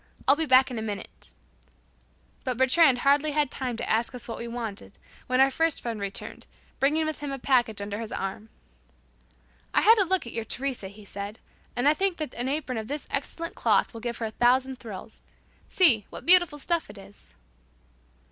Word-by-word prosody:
I'll 275 Hz, -, +6 dB
be 320 Hz, +1 st, -2 dB
back 260 Hz, 0 st, +5 dB
in 240 Hz, -, -3 dB
a -, -, -4 dB
minute." 210 Hz, -2 st, -7 dB, 1.1 s
But 255 Hz, -2 st, -2 dB
"Bertrand" 260 Hz, 0 st, +4 dB
hardly 290 Hz, +2 st, +3 dB
had 295 Hz, -3 st, +1 dB
time 250 Hz, -3 st, -3 dB
to -, -, -4 dB
ask 230 Hz, +3 st, 0 dB
us 245 Hz, -, -9 dB
what 230 Hz, -, -6 dB
we 235 Hz, -, -5 dB
wanted, 230 Hz, -4 st, -6 dB, 0.3 s
when 255 Hz, 0 st, +1 dB
our 270 Hz, +1 st, +5 dB
first 325 Hz, +2 st, +1 dB
friend 230 Hz, -3 st, -4 dB
returned, 200 Hz, -1 st, -6 dB, 0.3 s
bringing 305 Hz, +4 st, +2 dB
with 310 Hz, 0 st, -3 dB
him 290 Hz, -1 st, -5 dB
a 275 Hz, -, -3 dB
package 245 Hz, -5 st, +1 dB
under 205 Hz, +1 st, -5 dB
his 225 Hz, -2 st, -6 dB
arm. 195 Hz, +3 st, -5 dB, 1.3 s
"I -, -, +5 dB
had 445 Hz, +1 st, +6 dB
a 395 Hz, -, +4 dB
look 375 Hz, -3 st, 0 dB
at 235 Hz, -, -8 dB
your 225 Hz, -, -3 dB
Teresa," 255 Hz, -3 st, -4 dB
he 200 Hz, +2 st, -13 dB
said, 200 Hz, +2 st, -6 dB, 0.4 s
"and 245 Hz, +3 st, +1 dB
I 295 Hz, -, +6 dB
think 380 Hz, +2 st, 0 dB
that 305 Hz, -5 st, -5 dB
an 245 Hz, +2 st, -2 dB
apron 270 Hz, -5 st, -2 dB
of 220 Hz, -, -6 dB
this 290 Hz, +3 st, -5 dB
excellent 330 Hz, +4 st, -3 dB
cloth -, -, +2 dB
will 230 Hz, -, -8 dB
give 235 Hz, 0 st, -4 dB
her 230 Hz, -, -3 dB
a 220 Hz, -, -4 dB
thousand 255 Hz, +3 st, +2 dB
thrills. 220 Hz, -1 st, -9 dB, 0.5 s
See, 245 Hz, -, +4 dB
what -, -, -10 dB
beautiful 350 Hz, -4 st, +6 dB
stuff 335 Hz, +1 st, -1 dB
it 205 Hz, -, -11 dB
is." 195 Hz, -, -15 dB
255 Hz, 200 wpm, -26 LUFS, 225-295 Hz, 1.3 s, I'll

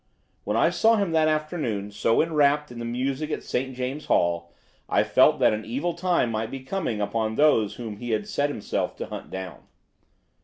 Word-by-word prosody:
When -, -, 0 dB
I -, -, +4 dB
saw 225 Hz, +1 st, +4 dB
him 200 Hz, -5 st, 0 dB
that 160 Hz, -1 st, +3 dB
afternoon 155 Hz, -, -2 dB
so 115 Hz, +5 st, +2 dB
enwrapped 150 Hz, -3 st, +2 dB
in 120 Hz, -, -8 dB
the 120 Hz, -, -4 dB
music 135 Hz, +5 st, -2 dB
at -, -, -3 dB
St. 130 Hz, +1 st, -2 dB
James's 130 Hz, +4 st, -4 dB
Hall 85 Hz, 0 st, +1 dB, 0.4 s
I -, -, +3 dB
felt -, -, +4 dB
that -, -, +4 dB
an 110 Hz, +1 st, -3 dB
evil 140 Hz, +11 st, -2 dB
time 170 Hz, -8 st, +1 dB
might 110 Hz, 0 st, -2 dB
be 135 Hz, +1 st, -6 dB
coming 130 Hz, -, -3 dB
upon 110 Hz, +1 st, -1 dB
those 130 Hz, -8 st, +3 dB
whom 110 Hz, -4 st, -6 dB
he 120 Hz, +2 st, -6 dB
had 110 Hz, -2 st, -1 dB
set 145 Hz, +1 st, 0 dB
himself 110 Hz, -8 st, -3 dB
to -, -, -4 dB
hunt -, -, -8 dB
down. 95 Hz, -1 st, -7 dB
130 Hz, 195 wpm, -25 LUFS, 110-155 Hz, 0.4 s, I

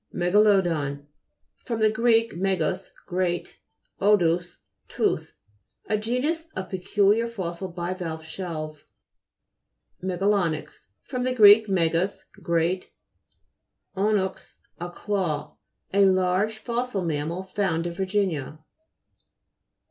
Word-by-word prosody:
MEGA'LODON 175 Hz, -7 st, +2 dB, 0.5 s
fr. 235 Hz, -, -4 dB
gr. 230 Hz, +1 st, +2 dB
megas, 185 Hz, -1 st, -1 dB, 0.2 s
great. 180 Hz, -2 st, -2 dB, 0.4 s
odous, 175 Hz, -4 st, +2 dB, 0.3 s
tooth. -, -, -1 dB, 0.5 s
A 215 Hz, -, 0 dB
genus 260 Hz, +10 st, -1 dB
of 190 Hz, 0 st, -5 dB
peculiar 205 Hz, +4 st, +2 dB
fossil 185 Hz, -4 st, -5 dB
bivalve 175 Hz, -2 st, -4 dB
shells. 160 Hz, -3 st, -6 dB, 1.2 s
MEGALO'NYX 185 Hz, -3 st, -1 dB, 0.2 s
fr. 255 Hz, -, -5 dB
gr. 220 Hz, -4 st, +6 dB, 0.3 s
megas, 175 Hz, +1 st, +1 dB, 0.2 s
great, 170 Hz, +2 st, 0 dB, 1.1 s
onux, 195 Hz, -1 st, -1 dB, 0.2 s
a 175 Hz, +1 st, -4 dB
claw. 175 Hz, -5 st, -2 dB, 0.4 s
A 200 Hz, 0 st, +5 dB
large 190 Hz, +3 st, +2 dB
fossil 235 Hz, -4 st, -2 dB
mam 150 Hz, -2 st, -1 dB
mal, 175 Hz, +3 st, -4 dB
found 185 Hz, -3 st, -1 dB
in 170 Hz, -, -3 dB
Virginia. 185 Hz, -6 st, -1 dB
185 Hz, 90 wpm, -25 LUFS, 170-205 Hz, 1.2 s, gr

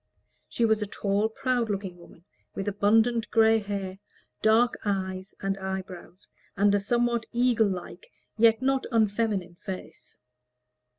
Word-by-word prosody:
She 235 Hz, -, +1 dB
was 220 Hz, -1 st, +2 dB
a 210 Hz, -, -2 dB
tall, 205 Hz, +1 st, 0 dB
proud 245 Hz, 0 st, -1 dB
looking 190 Hz, -3 st, -4 dB
woman, 170 Hz, 0 st, -17 dB, 0.3 s
with 195 Hz, -, -4 dB
abundant 220 Hz, +3 st, +2 dB
gray 225 Hz, 0 st, +4 dB
hair, 200 Hz, -2 st, -5 dB, 0.4 s
dark 225 Hz, +3 st, +4 dB
eyes 190 Hz, -1 st, -3 dB
and 195 Hz, 0 st, -2 dB
eyebrows, 190 Hz, -1 st, -7 dB, 0.3 s
and 200 Hz, +1 st, +4 dB
a 205 Hz, -, +3 dB
somewhat 235 Hz, +2 st, 0 dB
eagle 235 Hz, -2 st, +3 dB
like 190 Hz, -, -7 dB, 0.3 s
yet 225 Hz, +2 st, +4 dB
not 270 Hz, 0 st, +1 dB
unfeminine 210 Hz, -5 st, 0 dB
face. 185 Hz, -2 st, -9 dB
205 Hz, 130 wpm, -27 LUFS, 190-230 Hz, 0.4 s, gray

